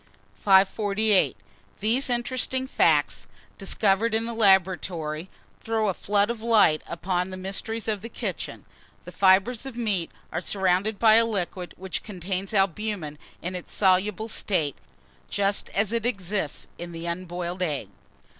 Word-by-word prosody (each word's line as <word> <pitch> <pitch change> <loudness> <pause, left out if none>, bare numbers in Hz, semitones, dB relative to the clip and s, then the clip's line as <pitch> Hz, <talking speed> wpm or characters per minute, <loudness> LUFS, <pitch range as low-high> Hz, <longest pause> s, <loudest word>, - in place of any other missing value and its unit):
548. 200 +1 +3 0.4
THESE 235 +6 +1
INTERESTING 255 +2 -1
FACTS, 265 - +2 0.3
discovered 205 +3 +1
in 225 +1 0
the 235 - -4
laboratory, 185 -5 +1 0.3
throw 220 -2 0
a - - 0
flood 205 +4 +1
of 235 -2 -6
light 220 -9 +4
upon 180 +2 -2
the 185 - -7
mysteries 200 +4 -4
of 210 -3 0
the 230 - -7
kitchen. - - -5 0.4
The - - -8
fibres 200 +6 +3
of 250 -3 -8
meat 205 -8 0 0.2
are - - -2
surrounded 190 +3 +1
by 220 0 +6
a 230 - +5
liquid 185 -4 -3
which 190 0 -4
contains 190 -1 -4
albumen 195 -6 -1 0.2
in 180 +2 -3
its 180 - -8
soluble 195 +2 +2
state, 170 -10 0 0.5
just 200 0 +1
as 205 +2 0
it 230 0 0
exists 195 - -2
in 175 0 -7
the 165 0 -6
unboiled 175 +1 -4
egg. 155 -6 -1
195 Hz, 140 wpm, -25 LUFS, 180-220 Hz, 0.5 s, by